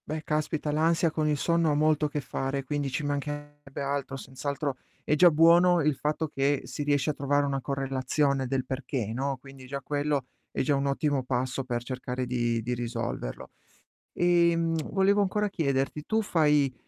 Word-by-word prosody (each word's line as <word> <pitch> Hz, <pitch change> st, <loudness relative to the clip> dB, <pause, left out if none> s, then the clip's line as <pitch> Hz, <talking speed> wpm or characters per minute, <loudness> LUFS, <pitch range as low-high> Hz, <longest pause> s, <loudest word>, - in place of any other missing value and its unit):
Beh, 155 Hz, +1 st, -4 dB
caspita 155 Hz, 0 st, -1 dB
l'ansia 165 Hz, +2 st, +2 dB
con 155 Hz, -1 st, 0 dB
il 150 Hz, -1 st, +1 dB
sonno 170 Hz, +2 st, +2 dB
ha 145 Hz, -, +2 dB
molto 155 Hz, 0 st, +3 dB
a -, -, -1 dB
che 150 Hz, 0 st, -3 dB
fare, 135 Hz, +1 st, -3 dB
quindi 145 Hz, +1 st, -2 dB
ci 130 Hz, +3 st, -3 dB
mancherebbe 145 Hz, 0 st, -5 dB
altro, 140 Hz, -1 st, -2 dB
senz'altro 140 Hz, +1 st, -4 dB, 0.3 s
è -, -, 0 dB
già 175 Hz, +3 st, +7 dB
buono 170 Hz, +3 st, +5 dB
il 150 Hz, -1 st, +2 dB
fatto 155 Hz, +3 st, -1 dB
che 140 Hz, 0 st, 0 dB
si -, -, -6 dB
riesce 145 Hz, 0 st, +1 dB
a -, -, -5 dB
trovare 145 Hz, +1 st, +1 dB
una 135 Hz, -1 st, -1 dB
correlazione 135 Hz, 0 st, 0 dB
del 130 Hz, 0 st, -1 dB
perché, 130 Hz, -4 st, -3 dB
no, 135 Hz, +2 st, -2 dB
quindi 135 Hz, -1 st, -13 dB
già 140 Hz, +1 st, -4 dB
quello, 145 Hz, -1 st, -1 dB, 0.2 s
è -, -, -2 dB
già 145 Hz, -, +2 dB
un 140 Hz, 0 st, 0 dB
ottimo 140 Hz, -1 st, 0 dB
passo 130 Hz, +1 st, -1 dB
per 120 Hz, -2 st, -2 dB
cercare 125 Hz, 0 st, -4 dB
di 120 Hz, -2 st, 0 dB
di 120 Hz, +2 st, -2 dB
risolverlo. 115 Hz, -, -4 dB, 0.6 s
Ehm, 170 Hz, -1 st, +3 dB, 0.2 s
volevo 200 Hz, +1 st, +3 dB
ancora 205 Hz, +1 st, +1 dB
chiederti, 140 Hz, -3 st, -1 dB
tu 220 Hz, 0 st, +1 dB
fai 150 Hz, -8 st, +2 dB
145 Hz, 180 wpm, -28 LUFS, 135-155 Hz, 0.6 s, già